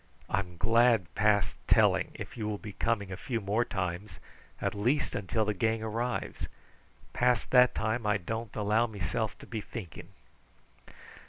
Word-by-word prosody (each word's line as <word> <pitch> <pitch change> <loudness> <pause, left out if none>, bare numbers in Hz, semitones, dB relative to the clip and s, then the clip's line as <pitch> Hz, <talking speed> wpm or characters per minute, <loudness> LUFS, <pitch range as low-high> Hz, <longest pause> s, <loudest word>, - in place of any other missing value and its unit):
I'm 90 -3 -1
glad 115 -3 +3
past 105 -1 +2
telling - - +4
if - - -7
you 110 -3 -3
will 105 -1 -2
be 105 0 -8
coming 100 -4 -1
a - - -3
few 120 +4 -3
more 105 +3 +1
times, 95 -1 -4 0.4
at - - -1
least 125 +8 +1
until 105 +3 0
the 105 - 0
gang 110 +3 0
arrives. 115 +3 -2 0.7
Past 125 0 +2
that 125 -1 +6
time 110 +1 -1
I 105 0 +3
don't 110 +4 -5
allow 110 +3 +2
mesilf 105 +1 -2
to - - -12
be 110 -2 -4
thinking." 100 -5 -8
110 Hz, 155 wpm, -30 LUFS, 100-115 Hz, 0.7 s, that